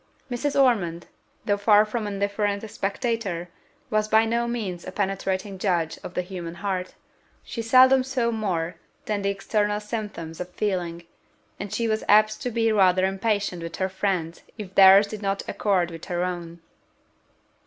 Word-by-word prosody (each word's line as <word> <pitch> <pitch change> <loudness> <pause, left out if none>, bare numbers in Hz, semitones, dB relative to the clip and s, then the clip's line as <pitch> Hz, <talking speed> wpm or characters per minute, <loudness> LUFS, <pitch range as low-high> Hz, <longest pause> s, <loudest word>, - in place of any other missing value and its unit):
Mrs. 275 +4 -1
Ormond, 185 -11 +2 0.4
though 205 -2 +1
far 210 +1 +5
from 215 0 -3
an 205 - -4
indifferent 200 +1 -1
spectator, 200 -4 -2 0.4
was 215 0 +1
by 220 +1 +4
no 235 +1 0
means 205 -7 -4
a - - -7
penetrating 195 0 -2
judge 175 -5 0
of 180 - -8
the 180 - 0
human 175 -2 -7
heart: 185 0 -3 0.5
she 230 - -5
seldom 255 +3 +6
saw 255 -3 -1
more 180 -7 -2 0.3
than 210 -1 -1
the 200 - 0
external 205 +1 0
symptoms 210 -7 -6
of 180 0 -5
feeling, 180 -3 -2 0.6
and 200 0 -5
she 230 - -1
was 220 0 -1
apt 215 +1 +5
to 250 - -2
be 225 -1 +1
rather 185 -3 +4
impatient 195 -2 -1
with 165 0 -6
her 190 0 -1
friends 185 -4 -2 0.2
if 200 -4 -8
theirs 195 +1 +8
did 215 0 -8
not 195 -1 -2
accord 185 -5 0
with 165 -1 -9
her 175 -1 -2
own. 170 -2 -5
200 Hz, 165 wpm, -25 LUFS, 180-215 Hz, 0.6 s, theirs